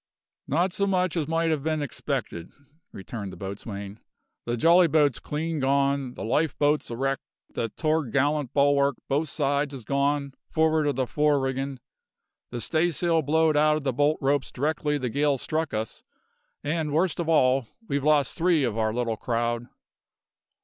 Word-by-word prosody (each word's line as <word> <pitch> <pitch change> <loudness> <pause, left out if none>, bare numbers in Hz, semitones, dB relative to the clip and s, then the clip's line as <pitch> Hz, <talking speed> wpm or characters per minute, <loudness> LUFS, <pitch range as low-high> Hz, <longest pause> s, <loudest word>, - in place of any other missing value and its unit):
"Not 175 +6 +1
so 200 - 0
much 185 -3 +1
as 160 -4 -1
might 165 0 +1
ha' 145 - -8
been 155 0 -1
expected," 85 -9 -4 0.4
returned 100 0 -7
the - - -10
boatswain. 100 +1 -7 0.5
"The 120 0 -1
jolly 170 +6 +6
boat's 150 -5 +2
clean 160 +1 -3
gone; 140 -1 +1
the - - -6
life 150 +7 0
boat's 150 +1 +1
a 120 - -4
wreck; 135 +1 0 0.3
the 115 - -2
to'gallant 145 -1 0
bulwark, 140 -1 +3
both 145 +3 0
sides, 140 -1 0
is 130 - -8
gone, 140 +2 0 0.2
for'ard 160 -1 +2
of 145 - 0
the 130 0 0
fore 150 +2 +2
riggin'; 135 0 -3 0.7
the 120 - -5
staysail 165 +3 +1
blowed 160 +1 +2
out 150 +1 +4
of 155 - -6
the 135 -2 0
bolt 145 +4 +2
ropes 140 0 +1
directly 150 +1 -1
the 130 -3 -2
gale 145 +2 +2
struck 155 +4 -2
us; 110 0 -4 0.6
and 150 0 -1
worst 170 +3 +1
of 165 -1 -1
all 130 -5 +3 0.2
we've 140 0 -1
lost 150 -3 +3
three 170 -3 +2
of 115 -3 -1
our 110 0 0
little 115 -2 -1
crowd." 120 0 -1
145 Hz, 165 wpm, -26 LUFS, 130-155 Hz, 0.7 s, jolly